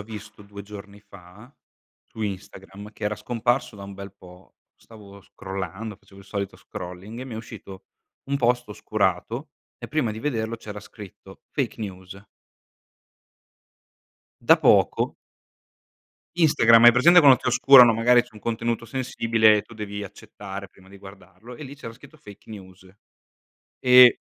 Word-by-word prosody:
ho - - -6
visto 105 -1 -11
2 100 0 -11
giorni 100 0 -12
fa, 100 +4 -17 0.5
su 110 - -9
Instagram, 95 +1 -8
che 105 - -9
era 105 +1 -1
scomparso 120 +2 -2
da 100 - -10
un 100 - -10
bel 100 0 -10
po', 90 -2 -18 0.2
stavo 100 -3 -16
scrollando, 95 +3 -7
facevo 95 0 -20
il 100 - -18
solito 100 0 -5
scrolling, 90 +6 -10
e - - -6
mi 125 -4 -9
è - - -6
uscito 110 -4 -11 0.4
un 140 +1 -2
post 125 -2 0
oscurato 110 - -3 0.3
e - - -8
prima 150 -8 -1
di 110 - -7
vederlo 115 -4 -3
c'era 105 -2 -9
scritto 95 -2 -14
fake 130 -4 -3
news. 95 -1 -9 2.2
Da - - +5
poco. - - +2 1.2
Instagram, 115 -8 +5
hai 120 - +10
presente 170 +9 +6
quando 135 -4 +7
ti - - -10
oscurano, 125 -1 +7
magari 120 +2 +4
c'è 125 - -21
un 105 - -13
contenuto 115 +1 -3
sensibile 115 -4 +1
e - - -4
tu - - -18
devi 105 -2 -7
accettare 100 -1 -10
prima 95 0 -22
di 100 0 -15
guardarlo, 95 +3 -14
e 150 - -11
lì 140 0 -10
c'era 115 -5 -9
scritto 135 +6 -17
fake 105 -6 -16
news. 95 -2 -13 0.9
E 125 -1 +6
105 Hz, 155 wpm, -23 LUFS, 100-120 Hz, 2.2 s, hai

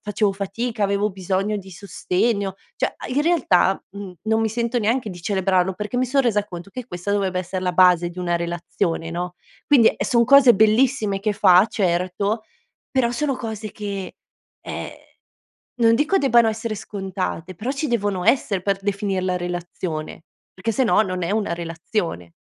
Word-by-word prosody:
facevo 210 -1 0
fatica, 210 +4 -3
avevo 200 +1 +1
bisogno 190 +2 -1
di 195 -1 -11
sostegno. 200 +2 -1 0.2
Cioè - - -1
a - - -8
in 260 +3 0
realtà, 255 - +2
mhmm, 200 -1 -8
non 220 +1 +1
mi 225 - +1
sento 235 +2 -1
neanche 230 +2 0
di 175 -1 -9
celebrarlo, 190 -1 +1
perché 210 +5 -4
mi 255 - +2
son 275 +2 +2
resa 210 -5 +1
conto 175 0 -9
che 250 +2 -7
questa 175 -3 -5
dovrebbe 190 -2 0
essere 185 +1 -5
la 180 - 0
base 175 -1 +5
di 175 +1 -11
una 175 -1 0
relazione, 170 -1 -2
no, 175 +1 -4 0.3
quindi 255 -6 +6
e - - -2
son 235 -1 +3
cose 270 -1 +7
bellissime 215 -1 +2
che 210 +1 0
fa, 185 -1 +6
certo, 195 +2 -1 0.5
però 255 -3 +1
sono 275 +3 -1
cose 220 -3 -5
che 200 -3 -6 0.5
ehm, - - -5 0.9
non 230 -2 +4
dico 305 +9 +2
debbano 240 -7 +4
essere 220 0 -4
scontate 190 -3 -5
però 230 +10 -3
ci 285 +2 -2
devono 205 -6 -1
essere 205 -8 +2
per 195 +1 0
definirla 195 -2 -1
relazione, 175 -3 -5 0.3
perché 190 +5 -2
se 245 +5 +1
no, 215 - +4
non 185 -4 -2
è 170 - -1
una 205 -5 0
relazione. 165 - -4
200 Hz, 170 wpm, -22 LUFS, 180-225 Hz, 0.9 s, cose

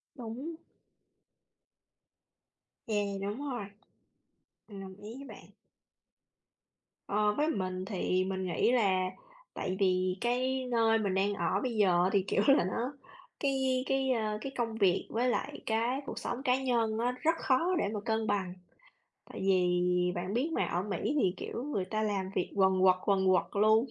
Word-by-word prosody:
Đúng. 255 +6 -6 2.3
Yeah, 205 -2 -1
đúng 205 +5 -3
rồi. 240 -6 -3 1.0
Mình 200 -3 -9
đồng 190 -1 -9
ý 215 +3 -9
với 275 - -9
bạn. - - -12 1.6
Ờ, 210 +1 +2
với 300 +1 +2
mình 185 -5 -2
thì 185 -2 0
mình 190 0 -3
nghĩ 180 +6 +1
là 190 -6 +2 0.4
tại 185 0 -3
vì 185 -1 +2
cái 255 +2 0
nơi 225 -1 +3
mình 200 -3 -1
đang 195 +2 +1
ở 180 0 0
bây 250 -3 -2
giờ 185 -3 +3
thì 195 -2 +3
kiểu - - +2
là 275 - +6
nó 230 +9 -2 0.5
cái 265 -2 +1
cái, 270 -1 +1
ơ, 215 -3 0
cái 270 - -5
công 230 -2 -1
việc 195 -4 +2
với 240 +3 0
lại - - -2
cái 230 +4 0
cuộc - - -5
sống 245 +2 -4
cá 260 -1 +2
nhân 230 -4 +1
á 245 +1 +1
rất 325 +1 +3
khó 330 +8 +2
để 200 - +1
mà 210 - -2
cân 220 0 0
bằng. 195 -3 -1 0.7
Tại - - -9
vì 180 -1 +2
bạn 180 +4 -3
biết 270 +7 0
mà, - - +1
ở 175 - -1
Mỹ 205 +7 -2
thì, 185 -4 +2
kiểu, 240 - -5
người 210 -11 -2
ta 215 +3 -2
làm 200 -3 -1
việc - - -1
quần 190 -1 +3
quật, 185 -1 +6
quần 195 -2 +2
quật 185 -1 +4 0.2
luôn 220 +4 +5
210 Hz, 170 wpm, -31 LUFS, 190-245 Hz, 2.3 s, là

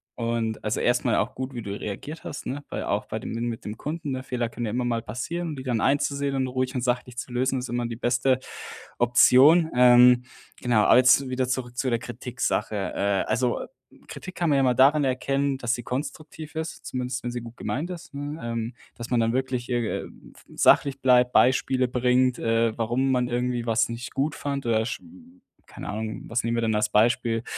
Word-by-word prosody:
Und, 115 -1 -2
also, 105 0 -1
erstmal 120 -1 +2
auch 125 +5 -1
gut, 130 +1 -5
wie 120 - -5
du 100 -1 -6
reagiert 145 +10 -6
hast, 145 - -7
ne, 145 +3 -4
weil - - -4
auch - - -1
bei - - -5
dem - - -5
n 115 - -2
mit 115 -1 -5
dem 105 +1 -6
Kunden, 150 -3 -4
Fehler 120 -3 -2
können 120 +1 -5
ja 105 - -2
immer 125 +3 -1
mal 115 -2 -1
passieren, 165 +10 -4
und 150 -3 -6
die - - -7
dann 125 -3 -1
einzusehen 140 +1 0
und 130 -1 0
ruhig 130 +1 -2
und 125 - -2
sachlich 125 0 -2
zu 125 - -6
lösen, 130 +2 0
ist 125 - -6
immer 120 0 -1
die 115 - -5
beste 125 +2 +1 0.6
Option. 130 +7 +6
Ähm, 125 0 +7 0.4
genau, 120 -4 +2
aber - - +6
jetzt 130 +1 +5
wieder 130 0 -1
zurück 125 -1 -3
zu 130 - 0
der 115 - +1
Kritik 125 +2 -8
Sache. 105 +1 0 0.2
Äh, 100 -1 +1
also, 125 0 0 0.5
Kritik 185 - -9
kann 170 - 0
man 145 - +3
ja 135 - +3
immer 130 -2 +3
daran 140 +4 +5
erkennen, 135 +1 0
dass 120 -2 -1
sie 120 - -4
konstruktiv 150 +5 -6
ist, 160 0 -5
zumindest 125 0 -4
wenn 120 - -2
sie 120 0 -4
gut 115 +1 -11
gemeint 155 +7 -3
ist, 175 -5 -9
ne? 145 +2 -5
Ähm, 115 0 -3 0.2
dass 120 0 -7
man 125 - +2
dann 115 0 +1
wirklich 130 -1 -2
ir 120 -3 -1
ähm, - - -14
f - - -20
sachlich 140 -1 +4
bleibt, 125 -1 +4
Beispiele 130 0 +3
bringt, 125 0 +2
äh, 115 0 +1
warum 120 +4 0
man 125 -1 +1
irgendwie 120 0 -1
was 115 0 +2
nicht 115 -1 -6
gut 145 +3 0
fand, 140 -2 -4
oder 110 -1 +1
sch 115 - -4 0.7
keine - - -8
Ahnung, 110 +1 -4
was 115 +1 0
nehmen 115 0 0
wir 115 - 0
denn 110 -1 +1
als 105 - +2
Beispiel? 115 +1 +2
125 Hz, 215 wpm, -25 LUFS, 115-135 Hz, 0.7 s, Ähm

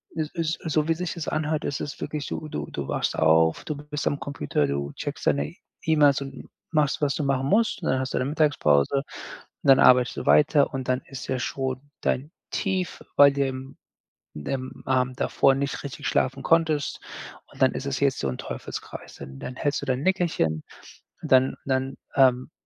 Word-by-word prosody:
es 155 -2 -2
ist 165 -1 -1
so 155 -1 0
wie 165 - +3
sich 180 +1 -3
das 170 -3 -6
anhört, 155 0 -1
ist 140 - -2
es 145 - -5
wirklich 150 -2 -3
so, 155 - -5
du 75 - -4
du 70 -1 -4
wachst - - -1
auf, 80 +1 +4
du 150 - -3
bist 150 0 -5
am 145 - 0
Computer, 75 - -1
du 70 0 -2
checkst - - -6
deine 75 0 +1 0.3
E-Mails 145 -3 +4
und 135 -1 -8 0.2
machst, 150 -3 +1
was 145 -2 +1
du 150 - -2
machen 135 -1 0
musst 220 +1 +2
und - - 0
dann 130 - +2
hast 130 0 -3
du - - 0
deine 130 +2 -1
Mittagspause 140 - +2 0.7
und - - -3
dann 135 - +8
arbeitest 125 -1 +5
du - - -4
weiter 145 -1 +5
und 130 -1 -4
dann 130 +1 +1
ist 135 - -8
ja 130 - -1
schon 130 0 -3 0.2
dein 145 +5 -1 0.2
Tief, 190 -3 -2
weil 140 -1 +8
du 140 - -1
ja 135 - 0
am 130 +1 -9 0.6
im 130 - -5
Abend 130 -1 0
davor 135 -1 +3
nicht 140 0 -3
richtig 145 +1 -5
schlafen 135 +1 0
konntest. 160 -4 +1 0.5
Und - - -15
dann 130 - +5
ist 140 - -4
es 135 - -2
jetzt 140 -2 +1
so 70 - -1
'n 65 - -4
Teufelskreis, - - -7
dann 65 0 -9
dann 125 - -6
hältst 145 +1 -1
du 145 - -7
dein 130 +2 0
Nickerchen, 170 - +1 0.6
dann 130 0 +4
dann, 130 0 -1 0.2
ähm, 130 0 +4
135 Hz, 200 wpm, -25 LUFS, 130-150 Hz, 0.7 s, dann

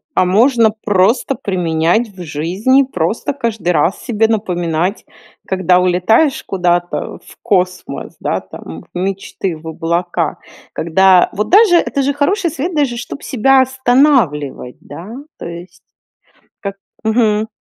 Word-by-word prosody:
А - - +3
можно 230 +4 +4 0.2
просто 205 +7 +2
применять 175 +3 0
в 190 -3 -12
жизни, 185 - +1
просто 215 - -2
каждый 230 -8 -3
раз 165 +2 +1
себе 225 -3 +1
напоминать, 180 -3 -1 0.4
когда 185 -1 +2
улетаешь 185 - +2
куда-то 175 -2 -1
в - - -18
космос, 185 -1 -2
да, - - -2
там, 80 +1 -10
в - - -6
мечты, 190 -2 -3
в 160 +1 -12
облака, 170 0 -2 0.4
когда 180 +2 +4
вот 210 +1 -2
даже 395 -2 +6
это 280 -4 0
же 280 +1 0
хороший 340 +5 0
совет, 330 +3 -4
даже 275 -5 0
чтоб 245 +4 -7
себя 265 +1 +3
останавливать, 245 - +1
да, 175 - -10 0.2
то - - -6
есть, 170 +1 -10 0.8
как 195 -1 -5 0.3
Мгм. 220 -1 +2
195 Hz, 130 wpm, -16 LUFS, 175-250 Hz, 0.8 s, даже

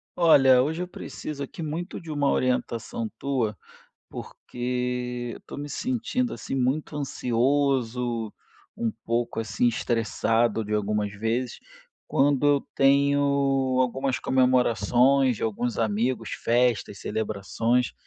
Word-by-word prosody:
Olha, 135 -7 +6
hoje 160 +5 -2
eu 180 - -3
preciso 150 -5 -7
aqui 150 - -8
muito 165 +4 -4
de 165 -2 -8
uma 145 -2 +1
orientação 115 -2 -1
tua, 125 -7 -1 0.6
porque, 125 0 -4
eu - - -12
tô - - -8
me 145 +1 -5
sentindo, 250 - -1
assim, - - -6
muito 135 +4 -1
ansioso, 125 -4 0 0.4
um 115 - -1
pouco, 115 0 -1
assim, 110 +1 0
estressado, 115 -1 0
de 105 +1 -2
algumas 105 0 0
vezes, 115 +4 -2 0.5
quando 140 0 +2
eu 145 -1 +3
tenho, 140 +1 +4 0.6
algumas 130 +1 0
comemorações 125 0 +3
de - - -8
alguns 115 +1 -2
amigos, 115 +3 0
festas, 120 -4 +1
celebrações 110 +3 -1
125 Hz, 115 wpm, -26 LUFS, 115-140 Hz, 0.6 s, Olha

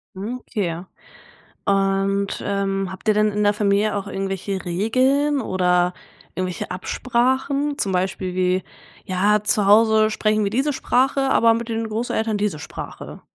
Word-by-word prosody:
Mhm, 220 +7 -5
okay. 175 -7 -3 0.8
Und, 195 0 +1
ähm, 195 -1 -1
habt 190 +4 -10
ihr 215 - +5
denn 210 0 +2
in 210 +1 -1
der 205 0 +4
Familie 205 0 +1
auch 200 0 -3
irgendwelche 195 0 -3
Regeln 260 +11 +1
oder 180 -3 +1 0.4
irgendwelche 185 -1 -4
Absprachen 260 +8 0
zum 195 - -1
Beispiel 185 0 -2
wie: 185 0 +1 0.4
„Ja, 205 +3 +2
zu 210 -1 +2
Hause 215 +1 +5
sprechen 215 0 +1
wir 200 - 0
diese 270 +6 0
Sprache, 270 +1 +1
aber 230 -3 +4
mit 230 +1 -4
den 225 0 -2
Großeltern 220 -1 -1
diese 205 -7 -1
Sprache?“ - - -8
205 Hz, 145 wpm, -22 LUFS, 190-230 Hz, 0.8 s, ihr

